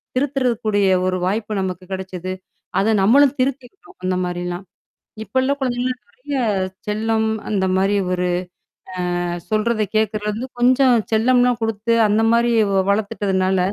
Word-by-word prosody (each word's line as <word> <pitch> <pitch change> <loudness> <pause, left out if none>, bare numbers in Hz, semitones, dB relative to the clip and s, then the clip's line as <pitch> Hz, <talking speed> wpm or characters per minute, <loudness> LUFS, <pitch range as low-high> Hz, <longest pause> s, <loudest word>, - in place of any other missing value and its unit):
திருத்துறதுக்கூடிய 245 -6 0 0.2
ஒரு 185 0 0
வாய்ப்பு 210 +3 -2
நமக்கு 185 -1 -4
கெடைச்சது. 185 -1 -5 0.5
அத 215 +3 +2
நம்மளும் 270 +7 +5
திருத்திக்கிட்டோம், 275 - -4
அந்த 185 0 0
மாரிலாம். 175 +1 -4 0.6
இப்போ 260 - -5
உள்ள 260 +2 +1
குழந்தைங்கலாம் 250 -1 -1
நெறையா 265 +3 -3 0.4
செல்லம், 220 +1 0 0.2
அந்த 195 -3 +1
மாரி 195 +2 +2 0.2
ஒரு 180 0 0 1.0
அ - - -2 0.2
சொல்றத 215 +1 +1
கேக்குறது 215 -1 0
வந்து 235 +5 -5
கொஞ்சம் 255 +1 +4 0.2
செல்லம்லாம் 245 +2 +3
குடுத்து, 225 +1 0
அந்த 210 +2 +2
மாரி 235 +1 +3 0.2
வ 190 -1 +3
வளத்துட்டதுனால 190 -2 0
220 Hz, 125 wpm, -20 LUFS, 195-250 Hz, 1.0 s, நம்மளும்